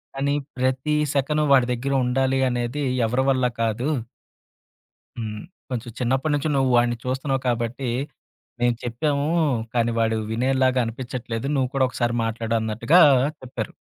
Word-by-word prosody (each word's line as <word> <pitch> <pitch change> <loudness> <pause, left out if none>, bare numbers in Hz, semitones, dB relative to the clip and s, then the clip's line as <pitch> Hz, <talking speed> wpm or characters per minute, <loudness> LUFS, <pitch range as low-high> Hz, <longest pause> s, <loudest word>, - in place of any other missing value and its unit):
కానీ, 140 +1 0 0.2
ప్రతి 130 +4 0 0.2
సెకను 150 +2 +1
వాడి 130 -3 +6
దగ్గర 135 +3 -2
ఉండాలి 130 +1 +1
అనేది 120 +3 -2 0.2
ఎవరి 125 +4 +1
వల్ల 130 -2 +2 0.2
కాదు." 115 +5 0 1.3
హ్మ్. 110 -2 -4 0.3
కొంచెం 120 -2 -4
చిన్నప్పటి 130 +4 0
నుంచి 145 +2 -1
నువ్వు 135 -1 +2
వాడిని 120 0 +2
చూస్తున్నావు 130 +1 -1
కాబట్టి, 120 +2 -1 0.7
మేం 120 0 +3
చెప్పాము, 140 +4 -1 0.5
కానీ 120 -1 +1
వాడు 110 -1 +1
వినేలాగా 130 +2 +2
అనిపించట్లేదు." 120 0 -5
నువ్వు 130 -2 +1
కూడా 130 -1 +3
ఒకసారి 120 -2 -1
మాట్లాడు 115 0 -2
అన్నట్టుగా 115 +10 +3 0.4
చెప్పారు." 130 -1 -6
125 Hz, 130 wpm, -23 LUFS, 120-135 Hz, 1.3 s, వాడి